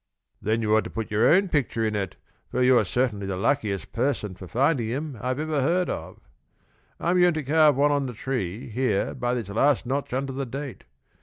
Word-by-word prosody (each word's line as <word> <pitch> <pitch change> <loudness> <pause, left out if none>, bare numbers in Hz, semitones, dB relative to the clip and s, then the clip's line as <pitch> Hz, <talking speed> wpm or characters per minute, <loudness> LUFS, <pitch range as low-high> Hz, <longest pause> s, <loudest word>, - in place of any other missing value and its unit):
"Then 110 +2 0
you 110 0 +3
ought 110 - +3
to - - -5
put 110 -1 -5
your 110 +3 +3
own 190 +4 +5
picture 135 -8 0
in 110 -1 -1
it, 100 -3 -3 0.3
for 125 - 0
you're 125 -4 +5
certainly 105 -2 -1
the 95 -1 -3
luckiest 105 -3 -1
person 115 -5 -1
for 95 0 -10
finding 130 - +1
them 140 +3 -3
I 125 - -2
ever 150 +2 -1
heard 175 +6 +1
of. - - -6 0.8
I'm 180 +1 +2
going 175 -2 +4
to 155 - -2
carve 150 +1 +4
one 145 +2 +3
on 140 -2 +1
the 125 - -6
tree, 110 -4 -3
here 110 -3 0
by 120 0 -1
this 115 -5 -4
last 135 +6 +2
notch 135 +3 -2
under 135 +1 -2
the 135 0 -3
date. 135 +1 -7
125 Hz, 210 wpm, -25 LUFS, 110-145 Hz, 0.8 s, own